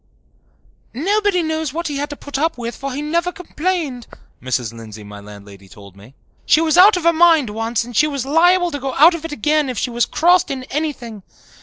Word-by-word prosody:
"Nobody 395 - 0
knows 315 -3 -3
what 335 +1 -3
he 290 -2 -4
had 290 +1 -3
to 290 - -7
put 285 -1 -6
up 325 0 -1
with, 235 -1 -5
for 275 0 -6
he 280 +3 -5
never 340 +4 -1
complained," 335 - -4 0.3
Mrs. 125 -3 -3
Lindsay, 110 -2 -11
my 105 0 -11
landlady, 100 -1 -14
told 100 0 -15
me. 105 +7 -17 0.3
"She - - +5
was 320 -1 +1
out 370 +2 +7
of 355 - -4
her 335 0 +4
mind 320 -8 +4
once 225 +1 -2
and 240 0 -11
she 300 - +3
was 280 -4 -4
liable 350 +4 +3
to 285 - -5
go 270 0 -4
out 320 +5 +6
of 330 -1 -6
it 330 - -6
again 295 +2 0
if 250 - -5
she 245 - -2
was 240 0 0
crossed 355 +3 +2
in 265 -2 -4
anything. 270 -8 -4
285 Hz, 215 wpm, -18 LUFS, 230-330 Hz, 0.3 s, out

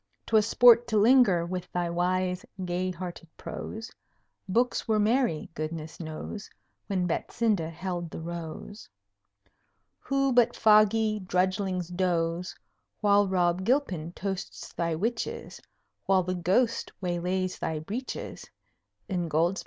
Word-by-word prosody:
'twas 220 -1 +3
sport 240 0 +7
to 220 - +1
linger 210 -6 +5
With 180 0 -5
thy 175 -1 -1
wise, 180 +1 0 0.2
gay 180 +1 -1
hearted 175 -2 -7
prose. 225 +1 -7 0.6
Books 235 +5 +1
were 220 -1 +2
merry, 220 - +1
goodness 155 0 -5
knows! 165 +6 -6 0.4
When 185 -3 0
Betsinda 195 -1 0
held 175 0 -4
the - - -7
Rose. 170 +5 -7 1.1
Who 275 -1 +1
but 240 -1 +4
foggy 215 0 +4
drudglings 185 -1 -1
doze 175 -1 0 0.5
While 205 -1 +4
Rob 180 -1 +1
Gilpin 190 - 0
toasts 195 -1 -5
thy 170 -1 -1
witches, 230 +8 -3 0.5
While 190 -1 +4
the 185 +1 -2
Ghost 195 +7 +1
waylays 180 +1 -2
thy 160 -1 -2
breeches, 215 +12 -6 0.6
Ingoldsby? 175 0 0
185 Hz, 115 wpm, -28 LUFS, 175-215 Hz, 1.1 s, sport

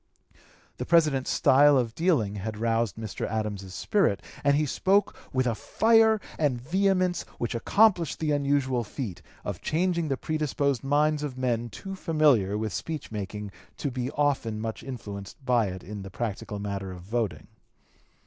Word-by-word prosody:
The - - -4
President's 155 -6 +3
style 145 +1 +5
of 120 -3 0
dealing 140 - +1
had 105 +2 -4
roused 115 -1 0
Mr. 110 -7 -4
Adams's 105 -4 -3
spirit, 195 - +1 0.2
and 140 0 +4
he 150 +1 +2
spoke 195 +7 +2 0.2
with 130 -1 +1
a 120 - +1
fire 220 - +4 0.2
and 140 -6 +1
vehemence 185 +4 +1 0.2
which 120 - -2
accomplished 175 - +3
the 155 -1 0
unusual 140 -3 +1
feat 105 - -6 0.2
of - - -4
changing 170 0 0
the 135 -2 -1
predisposed 140 -4 -1
minds 150 +2 +2
of 140 -4 -4
men 120 -2 -1
too 195 - -7
familiar 150 - +2
with 110 -2 -3
speech 140 - -5
making 105 -1 -5 0.3
to 140 - -2
be 125 0 -3
often 135 -7 0
much 110 0 -4
influenced 105 -1 -8
by 120 -4 +3
it 95 -1 -6
in 105 +1 -7
the 95 - -8
practical 105 0 -4
matter 100 -1 -4
of 90 -1 -9
voting. 110 0 -2
130 Hz, 160 wpm, -27 LUFS, 105-155 Hz, 0.3 s, style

